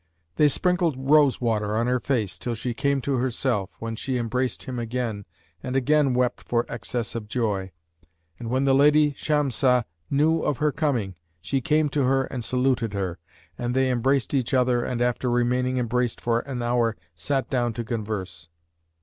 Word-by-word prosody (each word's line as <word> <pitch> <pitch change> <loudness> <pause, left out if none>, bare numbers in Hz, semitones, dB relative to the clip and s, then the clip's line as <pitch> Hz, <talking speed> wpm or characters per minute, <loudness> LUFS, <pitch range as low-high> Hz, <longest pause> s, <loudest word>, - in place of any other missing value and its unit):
They 150 - +6
sprinkled 175 +1 +1
rose 140 +1 +4
water 110 -3 0
on 115 - +1
her 125 +1 +1
face, 115 -7 -1
till 120 -1 -3
she 120 +2 -3
came 140 +3 0
to 135 0 -1
herself, 120 -5 -1
when 115 0 -5
she 130 +3 -2
embraced 125 +2 -2
him 125 -2 -5
again 115 -3 -3 0.4
and 130 0 -4
again 140 0 +3
wept 125 0 0
for 120 0 0
excess 115 0 -4
of 115 -3 -5
joy. 105 -5 -1 0.7
And 115 - -5
when 130 +3 +1
the 135 - +4
lady 150 +2 +5
Shamsah 135 -4 +1 0.3
knew 155 +4 +2
of 145 - 0
her 150 +2 +1
coming, 135 - -1 0.3
she 130 +10 -2
came 155 +3 +2
to 145 +1 0
her 135 +1 +2
and 125 -2 -5
saluted 125 -2 0
her; 95 -2 -3 0.4
and 120 +1 -2
they 130 -1 +2
embraced 130 +3 +1
each 135 0 +1
other 125 -1 +2
and 120 -1 -1
after 125 +1 0
remaining 125 +1 +1
embraced 125 0 0
for 115 -1 +1
an 125 -2 -5
hour 120 -2 +1 0.2
sat 135 -2 -2
down 120 -3 +1
to 120 - -4
converse. 100 -8 -5
125 Hz, 175 wpm, -25 LUFS, 115-135 Hz, 0.7 s, They